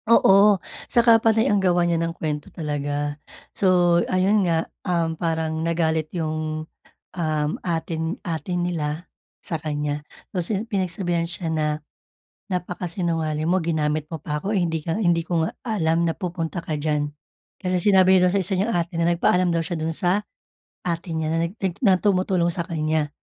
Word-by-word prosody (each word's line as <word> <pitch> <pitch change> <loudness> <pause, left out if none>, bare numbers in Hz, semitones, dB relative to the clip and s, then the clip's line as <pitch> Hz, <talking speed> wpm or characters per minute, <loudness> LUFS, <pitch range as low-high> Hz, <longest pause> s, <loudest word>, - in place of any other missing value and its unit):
Oo, 205 -2 +6 0.3
tsaka 230 -1 +5
panay 225 0 +3
ang 205 -1 +2
gawa 175 -2 +3
niya 170 -1 +1
ng 165 0 -2
kuwento 150 -2 -3
talaga. 145 -1 -3 0.3
So, 175 -2 +4
ayun 190 +1 +3
nga, 165 -1 +1 0.2
um, 170 -2 0
parang 160 -1 -1
nagalit 160 -2 0
yung, 155 -1 -2 0.5
um, 155 -3 0
ate 165 -1 -2 0.2
ate 165 +1 -4
nila 175 -2 -2 0.3
sa 165 - -3
kaniya. 150 -1 -3 0.2
Tapos 180 +2 -2
yun, 215 +3 -2
pinagsabihan 180 -4 -1
siya 170 0 -2
na, 155 -1 0 0.9
“Napaka-sinungaling 170 -3 -2
mo. 180 - +3
Ginamit 155 -2 0
mo 160 - -4
pa 150 0 -3
ako, 190 +8 -2
eh, 200 - +2
hindi 165 -3 -1
ka 165 +6 -1
hindi 170 -4 +2
ko 165 -1 0
nga - - -4
alam 170 -8 +1
na 165 - +1
pupunta 175 -2 -4
ka 160 -2 -3
diyan.” 150 0 0 0.6
Kasi 180 0 +1
sinabi 190 -1 +5
niya 180 - +5
dun - - -1
sa - - +3
isa 195 - -1
niyang 225 +4 0
ate 170 0 -1
na 170 - +3
nagpaalam 180 +1 +3
daw 165 -1 +1
siya 170 -1 -3
dun 160 0 -1
sa 180 +3 +2 0.6
ate 170 -1 -3
niya 160 -1 -1
na 165 +1 +1
nag 180 - -12 0.2
na 195 -7 +5
tumutulong 185 -2 +1
sa 170 0 -3
kaniya. 155 -3 0
170 Hz, 170 wpm, -23 LUFS, 160-185 Hz, 0.9 s, Oo